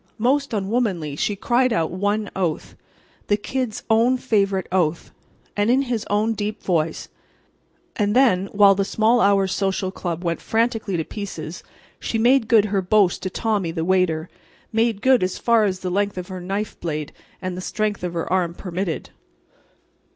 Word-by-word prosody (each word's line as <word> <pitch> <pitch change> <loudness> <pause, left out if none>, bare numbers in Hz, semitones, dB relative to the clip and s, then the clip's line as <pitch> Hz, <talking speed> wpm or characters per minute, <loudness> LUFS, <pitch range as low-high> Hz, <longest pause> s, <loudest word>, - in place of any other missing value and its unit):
Most 275 +5 +1
unwomanly, 195 - -1
she 205 +7 -1
cried 245 +5 +2
out 165 -6 0
one 205 +3 -1
oath—the 190 +3 -4
Kid's 250 0 -3
own 230 +3 +3
favorite 200 -6 +1
oath—and 185 +4 -2
in 260 +3 +4
his 240 -5 -3
own 215 +2 +1
deep 210 0 -4
voice; 165 -3 -1 0.9
and 210 0 0
then 225 -8 +4
while 200 0 +5
the 195 0 0
Small 225 +4 +2
Hours 195 -2 +3
Social 190 -1 -1
Club 175 -2 -4
went 170 -1 -2
frantically 225 -4 0
to 160 - -1
pieces, 175 -4 -7 0.4
she 225 - -2
made 240 +1 +4
good 220 -3 +5
her 200 -2 0
boast 190 -1 +2
to 185 - -3
Tommy, 205 -3 -1
the 165 0 -3
waiter—made 185 +5 -1
good 260 -2 +5
as 185 0 -1
far 230 -2 +3
as 185 -2 -2
the 185 - -3
length 200 +1 0
of 180 +1 -5
her 185 -1 -6
knife 200 +4 -4
blade 155 -3 -4 0.3
and 185 -1 -4
the 180 - -5
strength 210 0 -2
of 175 -1 -3
her 165 - -2
arm 175 -2 0
permitted. 180 -2 -4
200 Hz, 160 wpm, -22 LUFS, 180-220 Hz, 0.9 s, while